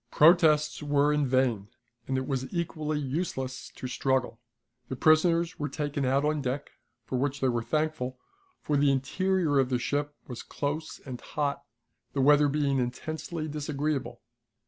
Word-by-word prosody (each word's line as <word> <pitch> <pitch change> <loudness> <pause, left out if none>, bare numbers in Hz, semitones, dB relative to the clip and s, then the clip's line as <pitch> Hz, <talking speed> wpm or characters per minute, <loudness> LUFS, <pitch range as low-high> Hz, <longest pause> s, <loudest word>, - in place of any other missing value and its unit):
Protests 155 -2 +5
were 145 0 +2
in 150 -2 +1
vain, 125 -6 +1 0.4
and 130 - 0
it 130 - -1
was 130 -1 -3
equally 155 -3 -2
useless 135 -2 -3
to - - -8
struggle. 125 -1 0 0.5
The 130 - -4
prisoners 165 +4 +3
were 145 0 -2
taken 145 0 -2
out 135 +3 +2
on 150 -1 +1
deck, 135 +2 -3 0.3
for 130 - -2
which 140 +1 -1
they 130 - +2
were 120 -1 0
thankful, 150 -2 -1 0.5
for 150 - +1
the 140 0 +4
interior 160 +2 +1
of 130 -2 +2
the 125 - +1
ship 145 +4 -2
was 125 -2 -6
close 155 +2 -4
and 130 -3 -7
hot, 145 -2 -2 0.5
the 140 - 0
weather 145 +2 +6
being 140 -1 +1
intensely 155 +6 -4
disagreeable. 145 -3 -3
145 Hz, 155 wpm, -28 LUFS, 130-155 Hz, 0.5 s, weather